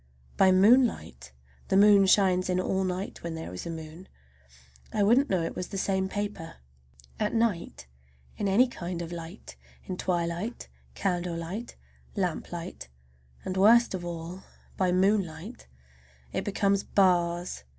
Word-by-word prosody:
By 190 -1 +5
moonlight—the 65 - +1
moon 200 -1 +6
shines 185 -2 +3
in 180 0 +1
all 190 +1 0
night 185 +1 -4
when 170 -1 -5
there 160 - -7
is 90 - -6
a - - -4
moon—I 65 - -8
wouldn't 245 +7 +4
know 180 -3 +1
it - - -4
was 180 - -4
the 195 - -6
same 190 0 0
paper. 205 -5 -5 0.6
At 210 +1 -1
night 225 - -1 0.5
in 205 - -2
any 220 +7 +4
kind 175 -7 -5
of 165 - -8
light, 170 +3 -9 0.3
in 185 - -5
twilight, 175 +6 -3 0.3
candlelight, 180 +3 -3 0.4
lamplight, 175 - -4 0.6
and 185 - -3
worst 225 +5 +5
of 185 -2 -4
all 175 +2 -6 0.3
by 185 -2 +1
moonlight, 190 +1 0 0.7
it - - -1
becomes 200 -1 +1
bars! 175 - +1
185 Hz, 130 wpm, -28 LUFS, 170-200 Hz, 0.7 s, moon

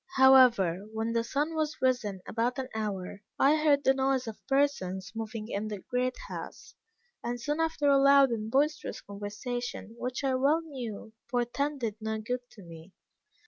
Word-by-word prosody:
However, 245 -9 +6
when 220 +1 -2
the 230 0 +1
sun 290 +7 -1
was 310 -1 -1
risen 235 -7 0
about 240 +3 -1
an 260 -1 -4
hour, 200 -3 -4 0.2
I 290 +3 +5
heard 295 -2 +3
the 265 - +5
noise 265 -1 +1
of 225 -2 -8
persons 190 -10 0
moving 225 -1 -5
in 210 -1 -3
the 210 -1 -4
great 250 +6 -2
house, - - -8 0.5
and 240 +1 -3
soon 295 +6 -2
after 320 -3 0
a 280 -1 +5
loud 275 -1 +6
and 220 -1 -3
boisterous 295 +5 0
conversation, 210 +3 -6
which 250 +2 -3
I 270 -1 +1
well 280 +5 +3
knew 240 -9 -7 0.2
portended 245 -1 -1
no 220 0 -2
good 245 +4 -2
to 205 - -13
me. 165 +2 -12
245 Hz, 165 wpm, -29 LUFS, 215-275 Hz, 0.5 s, However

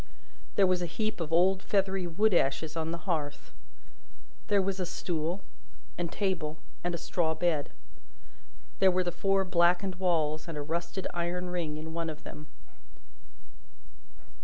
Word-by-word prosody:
There 195 - +6
was 185 -1 +2
a 175 - 0
heap 215 +3 -2
of 160 -1 -3
old 185 +3 +4
feathery 195 -2 +1
wood 205 +5 +3
ashes 155 0 +2
on 160 -1 -1
the 170 +1 -5
hearth. 155 -6 -2 0.9
There 205 -2 +4
was 190 0 0
a 185 - 0
stool, 170 +3 -2 0.5
and 170 -1 -2
table, 170 -6 -1 0.3
and 175 0 0
a - - -2
straw 160 -2 0
bed. 160 -3 +1 1.1
There 190 - +7
were 185 0 +2
the 175 - -1
four 195 +2 +2
blackened 180 +1 +3
walls, 160 -4 +1
and 165 -2 -5
a - - -2
rusted 170 +4 -3
iron 180 +1 -2
ring 165 -4 -2
in 160 +1 -6
one 165 0 -2
of 155 -1 -8
them. 150 - -9
175 Hz, 155 wpm, -30 LUFS, 160-190 Hz, 1.1 s, There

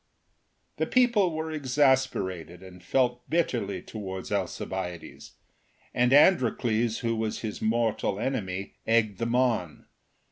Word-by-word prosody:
The - - 0
people 235 -8 +3
were 160 0 -4
exasperated, 130 - 0
and 90 -1 -13
felt 125 -2 0
bitterly 160 -7 -1
towards 95 -4 -7
Alcibiades, 90 -3 -4 0.6
and 125 +1 +2
Androcles, 120 - +3
who 115 -1 0
was 110 -1 -3
his 110 -2 -5
mortal 110 -3 0
enemy, 100 -8 -3
eggedthemon. 115 - +1
115 Hz, 100 wpm, -27 LUFS, 100-130 Hz, 0.6 s, people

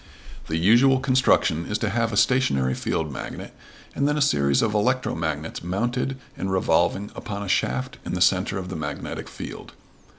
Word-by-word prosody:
The 80 - -1
usual 120 +9 +5
construction 130 - +2
is 105 - -1
to 110 - -1
have 115 +1 0
a 100 - -2
stationary 70 - +2
field 80 +1 -2
magnet - - -7 0.4
and 140 - +1
then 150 0 +1
a - - +1
series 70 - +2
of 110 - +1
electromagnets 85 - -1
mounted 120 +9 -1 0.2
and 95 - -3
revolving 95 +2 +1
upon 100 -1 -5
a - - -6
shaft 130 +7 -1
in - - -4
the - - -2
center 95 +1 +3
of 90 -1 -5
the 95 - -5
magnetic 75 -2 -5
field. - - -9
100 Hz, 170 wpm, -24 LUFS, 80-125 Hz, 0.4 s, usual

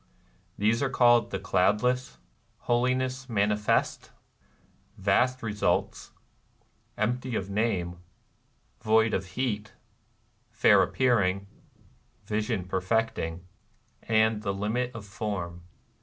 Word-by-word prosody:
They 105 +2 +3
are 135 - +1
called 120 -2 +4
The - - -3
Cloudless, 105 - +1 0.4
Holiness 130 +2 0
Manifest, 105 -1 0 0.9
Vast 120 +6 +1
Ee 110 - -2
sults, 105 - -1 0.9
Empty 125 +3 -1
of 100 -1 -3
Name, 95 -5 -1 0.8
Void 110 +1 +3
of 95 - -1
Heat, 110 -4 -2 0.8
Fair - - +5
Appearing, 100 -7 +1 0.8
Vision 105 -2 -2
Perfecting, 95 -3 -1 0.6
and 110 -1 +2
The 100 -3 -2
Limit 110 +5 -1
of 110 -3 -8
Form. 100 -5 -5
110 Hz, 95 wpm, -27 LUFS, 100-120 Hz, 0.9 s, Fair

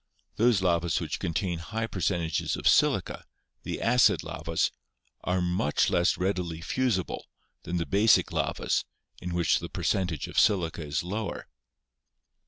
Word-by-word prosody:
Those 115 -4 +3
lavas 85 -1 +1
which - - -4
contain 85 +1 -2
high 110 +7 -3
percentages 85 -6 -1
of - - -2
silica, - - +2 0.4
the - - -5
acid 125 +1 +3
lavas, 80 +1 -1 0.5
are 90 0 0
much 90 -4 +1
less 85 +1 +2
readily 90 -3 -2
fusible 105 +1 -1 0.4
than 90 +1 -2
the 85 - -1
basic 100 +3 +3
lavas, - - 0 0.4
in 90 -1 -4
which 85 -1 +2
the - - -7
percentage 90 -6 -1
of - - 0
silica 85 -5 +2
is 75 +2 -2
lower. 100 +1 -4
90 Hz, 135 wpm, -28 LUFS, 85-100 Hz, 0.5 s, Those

